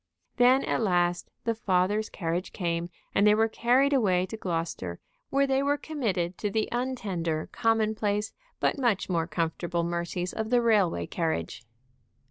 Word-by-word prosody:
Then 255 +2 +5
at - - 0
last 175 -4 +1
the 230 - +1
father's 205 0 +1
carriage 170 +1 -3
came, 170 -2 -2 0.2
and 200 - +4
they 210 - +6
were 220 +1 +3
carried 250 +5 +2
away 185 -8 +3
to 225 - -7
Gloucester, 165 - -3 0.3
where 275 0 +3
they 270 0 +1
were 285 +1 +1
committed 200 - -2
to 210 - -1
the 215 +2 0
untender, 195 -11 -2
commonplace, 215 -1 0 0.3
but - - +1
much 225 -8 +1
more 165 -2 0
comfortable 170 +1 -1
mercies 170 +1 -3
of 220 0 -3
the 245 0 +4
railway 210 -7 +2
carriage. 140 - -3
200 Hz, 150 wpm, -28 LUFS, 175-230 Hz, 0.3 s, they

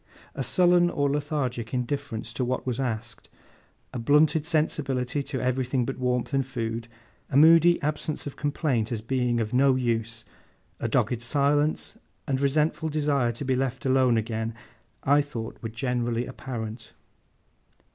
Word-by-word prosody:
A - - -4
sullen 175 -1 +4
or 145 -4 0
lethargic 135 -5 -2
indifference 125 -3 -3
to 125 - -2
what 125 +1 -2
was 125 -1 -2
asked, 115 -3 -4 0.6
a 125 - -3
blunted 150 +5 +3
sensibility 145 -5 0
to 140 -1 -4
everything 130 0 0
but 135 +1 -5
warmth 125 +1 -1
and 135 0 +2
food, 115 -3 -4 0.4
a 135 - +1
moody 165 +3 +7
absence 150 +1 -2
of 145 - -6
complaint 140 -6 -1
as 115 - -1
being 120 +1 0
of 110 0 -2
no 135 +1 +4
use, 115 -2 -2 0.5
a - - -1
dogged 120 -1 +1
silence 145 +4 0 0.3
and 135 -1 -1
resentful 155 +3 +1
desire 145 -5 +1
to 120 +5 -6
be 130 0 +1
left 130 -1 -2
alone 130 -2 +3
again, 110 0 -2 0.5
I 145 +2 +4
thought 120 -6 -6
were 115 - -4
generally 120 0 -1
apparent. 115 -3 -7
130 Hz, 145 wpm, -26 LUFS, 120-145 Hz, 0.6 s, moody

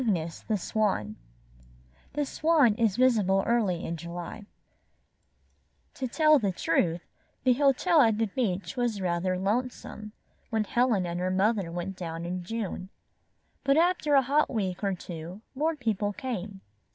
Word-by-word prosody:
CYGNUS, 170 -8 -1
THE 215 - +1
SWAN 190 - -1 1.0
The 295 +1 0
Swan 300 -5 +3
is 220 -3 +1
visible 210 -7 +3
early 210 -8 +1
in 170 - -3
July 175 +5 -7 1.5
To 260 - -3
tell 305 +3 +4
the 200 -5 0
truth, 170 -1 0 0.4
the 255 - +5
hotel 290 +5 +4
at 225 -4 +4
the 225 - +2
beach 200 -1 -2
was 240 -4 -1
rather 180 0 0
lonesome, 215 +1 -3 0.4
when 220 -1 +1
Helen 230 -4 +1
and 175 0 -3
her 180 +1 0
mother 195 -1 +1
went 175 +3 -4
down 165 -2 -5
in 180 +1 -3
June. 195 -2 -4 0.7
But 275 +1 +3
after 330 -3 +3
a 270 - +6
hot 285 +4 +2
week 195 -5 -2
or 195 -1 +1
two, 175 +2 -8
more 315 +4 0
people 215 -6 -1
came. 200 -5 -5
210 Hz, 145 wpm, -28 LUFS, 180-250 Hz, 1.5 s, a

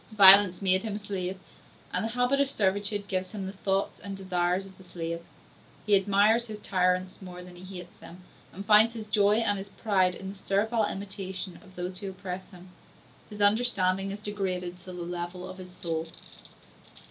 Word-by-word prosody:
Violence 195 -1 +9
made 190 0 +3
him 215 -1 -4
a - - -4
slave, 190 -2 -4 0.5
and - - +1
the 225 - -2
habit 245 +4 +1
of 280 - +1
servitude 205 -2 -1
gives 185 0 -2
him 200 -3 -5
the 190 - -4
thoughts 195 0 -2
and 195 -1 -7
desires 180 0 -1
of 195 - -13
a - - -13
slave; 170 -2 -5 0.6
he 210 - +5
admires 205 +4 +3
his 215 -1 -7
tyrants 185 0 0
more 180 -1 -9
than 180 0 -13
he 185 +1 -9
hates 175 0 -11
them, 180 +2 -13 0.3
and 195 +2 -8
finds 220 +2 +5
his 220 -2 -6
joy 205 -1 +3
and 205 -3 +1
his 195 +1 -8
pride 190 -4 +1
in 190 +1 -7
the 195 - -8
servile 210 +3 0
imitation 190 -2 -5
of 185 -2 -18
those 180 +1 -4
who 200 -1 -5
oppress 185 -1 -7
him: 180 -1 -14 0.6
his 210 -1 -8
understanding 195 -3 +4
is 200 - -5
degraded 185 -4 -4
to 185 - -21
the 185 - -8
level 175 +1 -5
of 185 0 -10
his 180 -1 -9
soul. 165 -2 -4
195 Hz, 190 wpm, -28 LUFS, 180-205 Hz, 0.6 s, Violence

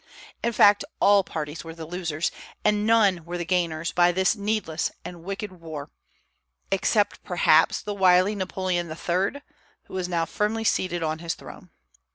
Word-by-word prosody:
In 235 - +1
fact, 205 -2 +5 0.2
all 200 -1 +5
parties 155 -2 -5
were 165 0 -9
the 165 -1 -7
losers, 170 -2 -2 0.3
and 210 0 +2
none 205 -6 +4
were 175 +2 -5
the 175 - -3
gainers, 165 -2 0
by 175 0 +4
this 190 +4 +2
needless 205 -6 -1 0.2
and 175 -2 -8
wicked 195 +2 -5
war, 160 -5 -8 0.8
except 205 +2 +1
perhaps 165 -3 +3
the 210 - -3
wily 185 0 +4
Napoleon 185 -3 -2
III., 185 - -2 0.4
who - - -16
was 185 -1 -2
now 170 -2 0
firmly 215 +5 -1
seated 185 -6 0
on 155 0 -2
his 165 -1 -3
throne. - - -12
180 Hz, 160 wpm, -25 LUFS, 165-205 Hz, 0.8 s, fact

